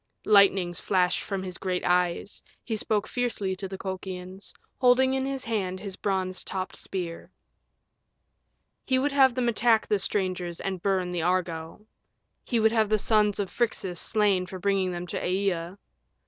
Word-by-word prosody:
Lightnings 195 -4 +4
flashed 180 -2 +1
from 195 -2 -4
his 185 -1 -7
great 185 -1 -2
eyes; 180 +2 0 0.2
he 225 - -3
spoke 215 -1 0
fiercely 225 -6 -2
to 195 - -5
the 190 0 -7
Colchians, 190 0 -6 0.3
holding 260 +1 +4
in 265 0 0
his 270 -1 -3
hand 190 -5 -2
his 195 -2 -6
bronze 190 -2 -2
topped 190 -1 -4
spear. 175 -3 -5 1.5
He 260 - +1
would 285 +3 +1
have 265 -3 +5
them 250 -2 0
attack 230 -1 +3
the 210 - +1
strangers 185 -3 0
and 190 -2 -4
burn 185 -2 0
the 175 -1 -2
Argo. 170 +1 -2 0.6
He 235 - 0
would 220 0 +4
have 220 -2 +2
the 215 - +3
sons 210 -1 +2
of 200 -2 -2
Phrixus 190 -7 -1
slain 200 -4 +1
for 185 - -7
bringing 190 0 +1
them 175 0 -4
to - - -4
Aea. 180 -1 -1
195 Hz, 160 wpm, -27 LUFS, 180-215 Hz, 1.5 s, have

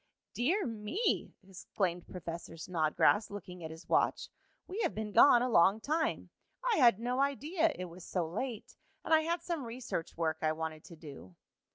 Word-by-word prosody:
"Dear 345 - +1
me!" 230 - -1
exclaimed 180 -2 -3
Professor 170 -2 -7
Snodgrass, 165 +5 +2
looking 180 -3 -8
at 160 - -5
his 160 +2 -11
watch, - - +1 0.4
"we 395 +5 -4
have - - 0
been 215 -1 -4
gone 240 +2 +7
a - - +1
long 195 -2 +4
time. 315 +7 -1 0.4
I - - +2
had 240 -7 +6
no 245 +2 -1
idea 310 +4 +1
it 185 - -5
was 175 0 -11
so 175 -2 -2
late, 220 +6 -5 0.3
and - - +1
I 315 - +6
had 335 +1 -2
some 335 -5 -3
research 230 -9 -5
work 160 -1 -1
I 155 0 +1
wanted 155 -1 -5
to 170 - -11
do." 140 - -12
210 Hz, 175 wpm, -32 LUFS, 170-275 Hz, 0.4 s, gone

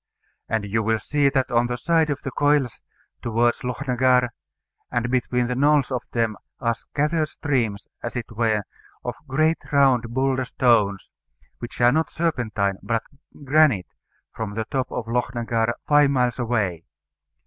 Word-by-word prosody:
And 110 -2 0
you 110 +3 0
will 110 +1 +1
see 145 +4 +1
that 135 -2 0
on 120 0 +3
the 125 0 -3
side 160 +4 +2
of 145 -1 -3
the 135 - -4
Coiles 145 -3 +1 0.4
towards 120 +1 +1
Lochnagar, 125 0 +2 0.6
and 120 0 -1
between 125 -1 +1
the 125 - -1
knolls 145 +1 +3
of 125 -2 -1
them, 115 -3 0 0.2
are 115 -2 +1
scattered 150 +6 -1
streams, 120 -11 -1
as 120 - -5
it 120 - -2
were, 110 -2 +1 0.4
of - - -2
great 155 +4 +2
round 135 -4 +4
boulder 130 +1 0
stones 110 -7 +2 0.5
which 120 - -8
are 120 0 +6
not 160 +3 +1
serpentine, 110 - -1
but 115 -1 -1 0.4
granite 140 -9 +3 0.4
from 105 -2 -5
the 110 0 -2
top 130 -2 -1
of 125 - -3
Lochnagar, 115 -1 0 0.2
five 145 -1 +5
miles 125 -3 +1
away. 105 -9 -1
125 Hz, 150 wpm, -23 LUFS, 115-140 Hz, 0.6 s, are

